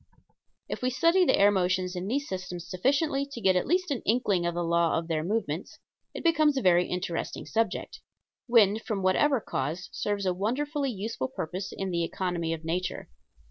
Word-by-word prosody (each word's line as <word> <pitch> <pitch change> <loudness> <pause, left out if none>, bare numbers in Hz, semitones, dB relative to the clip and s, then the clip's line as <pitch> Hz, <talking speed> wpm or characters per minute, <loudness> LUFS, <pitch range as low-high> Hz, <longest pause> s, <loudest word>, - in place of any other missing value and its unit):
If - - -5
we 250 - +1
study 335 +9 +3
the - - +3
air 200 +1 +6
motions 185 -1 0
in 180 +1 -4
these 280 +6 -1
systems 180 -2 -5
sufficiently 275 - +1
to 240 - -6
get 190 -4 +3
at 180 - +1
least 360 0 +1
an 265 - -1
inkling 205 -6 +1
of 175 - -2
the 175 - -1
law 170 -1 +2
of 165 0 -3
their 160 -2 -1
movements, 180 -4 -3 0.4
it - - -5
becomes 310 -4 +3
a - - +1
very 180 -1 +4
interesting 180 -2 -3
subject. 225 0 -2 0.5
Wind 220 -3 +4
from 200 -4 -3
whatever 265 +9 +3
cause 180 -2 -3
serves 205 -1 -2
a 185 - +2
wonderfully 275 - -1
useful 210 - -3
purpose 180 +8 -5
in 195 -1 -4
the 170 -1 0
economy 170 -1 -2
of 165 0 -4
nature. 180 +3 -3
190 Hz, 185 wpm, -28 LUFS, 175-250 Hz, 0.5 s, air